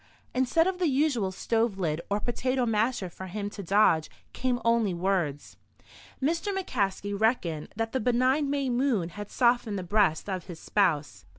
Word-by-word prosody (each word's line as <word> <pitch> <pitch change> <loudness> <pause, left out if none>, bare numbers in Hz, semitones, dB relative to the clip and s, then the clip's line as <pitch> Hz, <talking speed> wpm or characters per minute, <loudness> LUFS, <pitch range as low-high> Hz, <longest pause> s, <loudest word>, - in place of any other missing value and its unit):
Instead 260 +6 +2
of 375 0 -1
the 355 - +2
usual 265 -8 +1
stove 225 +1 0
lid 165 -4 -1
or 205 +1 +1
potato 255 +3 -1
masher 225 -2 0
for 190 +2 -9
him 205 +2 -4
to 205 - -7
dodge, 190 -4 +3 0.2
came 250 -1 -1
only 230 -5 +2
words. 170 -6 -1 0.6
Mr. 330 +8 0
McCaskey 205 - -2
reckoned 195 -8 0
that 225 +1 -2
the 260 - 0
benign 255 +5 +2
May 280 -1 0
moon 240 -8 +1
had 205 +3 -8
softened 240 -4 +2
the 185 - -4
breast 190 -3 +2
of 185 -3 -3
his 175 -4 -9
spouse. 150 - 0
215 Hz, 165 wpm, -28 LUFS, 190-255 Hz, 0.6 s, dodge